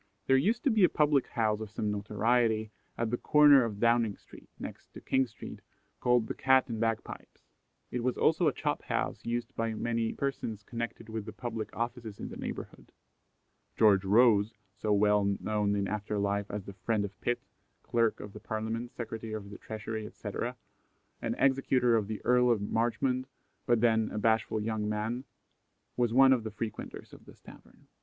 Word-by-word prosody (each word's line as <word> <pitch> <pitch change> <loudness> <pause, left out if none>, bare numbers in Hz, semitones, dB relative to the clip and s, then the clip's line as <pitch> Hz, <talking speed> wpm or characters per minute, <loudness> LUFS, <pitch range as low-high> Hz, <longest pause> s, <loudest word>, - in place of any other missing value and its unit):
There 135 - +4
used 210 - +2
to 275 - +3
be 220 -3 +3
a 180 - +7
public 145 -3 +2
house 110 -2 0
of 110 - -5
some 105 +1 -2
notoriety 110 +1 +1 0.3
at 115 -1 -1
the 120 - 0
corner 145 -2 +6
of 105 -3 -4
Downing 115 -3 +2
street, - - -16
next - - -9
to - - -9
King 130 -1 +1
street, - - -10 0.4
called 125 -2 +3
the - - -4
"Cat 130 0 +3
and 115 -3 -4
Bagpipes." 115 -1 -3 0.5
It 125 - -2
was 125 0 0
also 160 +1 +3
a - - +4
chop - - -2
house - - -2
used 120 0 -3
by 115 -1 -1
many 115 0 -1
persons 115 -6 -3
connected 115 0 -5
with 110 -2 -5
the - - -5
public 115 -3 -5
offices 115 -3 -4
in - - -5
the - - -8
neighbourhood. - - -7 0.9
George 100 -3 +5
Rose, 110 +1 +4 0.2
so 105 - -2
well 105 -1 +3
known 105 -1 0
in 100 -1 0
after 105 0 -3
life 100 0 -1
as 105 -2 -5
the 100 - -8
friend 100 +3 -1
of 100 - -10
Pitt, 120 0 0 0.4
Clerk 115 -2 +1
of 105 -1 -9
the 105 - -9
Parliament, 110 +3 -4
Secretary 115 -3 -6
of 100 -2 -6
the 100 - -9
Treasury, 110 0 -5
etc., - - -5 0.7
and - - -2
executor 130 -3 +3
of 105 -3 +1
the 110 -1 -6
Earl 125 0 +4
of 115 -3 +3
Marchmont, 120 +5 0 0.4
but 120 -3 +3
then 110 -2 +3
"a - - -5
bashful 110 0 +1
young 105 -1 -2
man," 110 +5 -2 0.7
was 120 -2 +1
one 130 +2 +7
of 120 -4 0
the 110 - -4
frequenters 110 0 -6
of - - -14
this - - -16
tavern. - - -16
115 Hz, 185 wpm, -30 LUFS, 105-120 Hz, 0.9 s, a